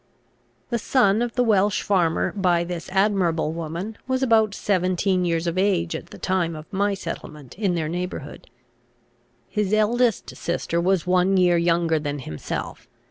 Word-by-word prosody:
The 235 - 0
son 220 -3 +3
of 240 -1 -2
the 250 - +3
Welch 205 -3 +2
farmer 175 -5 +1
by 180 -4 +1
this 175 -1 -6
admirable 190 -5 +1
woman 170 +6 -5
was 260 0 0
about 220 -4 +3
seventeen 185 -1 +1
years 165 -1 0
of 170 +2 -1
age 185 -4 +1
at - - -7
the - - -12
time 175 -3 -1
of 155 0 -8
my 200 +1 +1
settlement 150 -7 -8
in 195 -3 0
their 160 -2 -1
neighbourhood. 175 -3 -5 1.0
His 210 -1 -1
eldest 230 +1 +1
sister 170 0 -2
was 185 0 +1
one 185 +1 +3
year 180 -1 +4
younger 170 -1 +2
than 145 -1 -3
himself. 80 - -6
180 Hz, 155 wpm, -23 LUFS, 170-205 Hz, 1.0 s, year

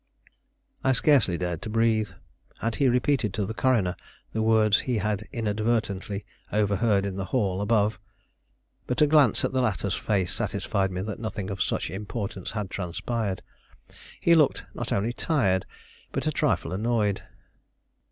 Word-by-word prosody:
I 130 0 +4
scarcely 125 - +3
dared 90 -2 -3
to - - -5
breathe. 110 -1 +2 0.5
Had 115 0 -2
he 140 - +3
repeated 125 -4 +1
to 105 - 0
the 110 - -4
coroner 110 -8 +2 0.4
the 110 - 0
words 110 -2 +4
he 125 -3 -1
had 105 +1 -1
inadvertently 105 -3 -1 0.3
overheard 105 0 +2
in 95 -1 -3
the 95 - -2
hall 100 -3 0
above? 105 0 +2 0.9
But 125 +4 +2
a - - +8
glance 145 -6 +4
at - - -1
the 130 -1 +1
latter's 100 -4 0
face 95 -4 0
satisfied 95 -1 -1
me 90 0 -3
that 105 +3 -5
nothing 105 -3 -4
of 95 - -4
such - - -1
importance 100 -1 -4
had 105 -1 -4
transpired. 100 +3 -3 0.8
He 170 - +4
looked 155 -4 +3
not - - -4
only 110 +5 +1
tired, 95 - +1 0.4
but - - -2
a - - +2
trifle 85 - 0
annoyed. 105 -1 +1
105 Hz, 150 wpm, -26 LUFS, 95-115 Hz, 0.9 s, a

